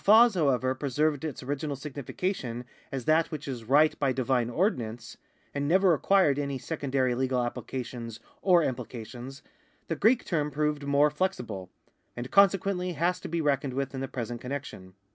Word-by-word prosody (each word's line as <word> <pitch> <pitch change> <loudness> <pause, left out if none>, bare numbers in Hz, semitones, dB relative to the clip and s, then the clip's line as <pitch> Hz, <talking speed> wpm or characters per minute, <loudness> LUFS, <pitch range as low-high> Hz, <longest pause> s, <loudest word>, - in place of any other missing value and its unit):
While 220 +4 +8
fas, - - -11
however, 130 -7 +2
preserved 145 +2 0
its 150 -4 -4
original 145 +2 -2
significa 145 +6 -3
tion 120 -3 -6 0.3
as 130 -3 -4
that 160 +1 +3
which 150 -2 -6
is 125 -4 -5
right 145 +6 +4
by 140 -2 +2
divine 125 -2 +1
ordinance, 120 - -1 0.4
and 145 0 -1
never 185 +2 +5
acquired 155 -3 +3
any 140 -1 -2
secondary 135 -2 -1
legal 130 0 0
applications 120 -2 -5 0.2
or 180 -3 +5
imjilications, 125 +1 -6 0.5
the 165 - 0
Greek 225 - +3
term 150 -4 0
proved 150 0 -1
more 145 +1 +4
flexible, 125 - -3 0.5
and 120 +1 -5
consequently 195 -2 +3
has 170 +4 0
to - - -7
be 170 0 -1
reckoned 140 -3 0
with 135 0 -2
in 130 - -4
the 135 - -2
present 120 -2 -5
con 125 - -7
nection. 130 -10 -6
140 Hz, 170 wpm, -28 LUFS, 125-155 Hz, 0.5 s, While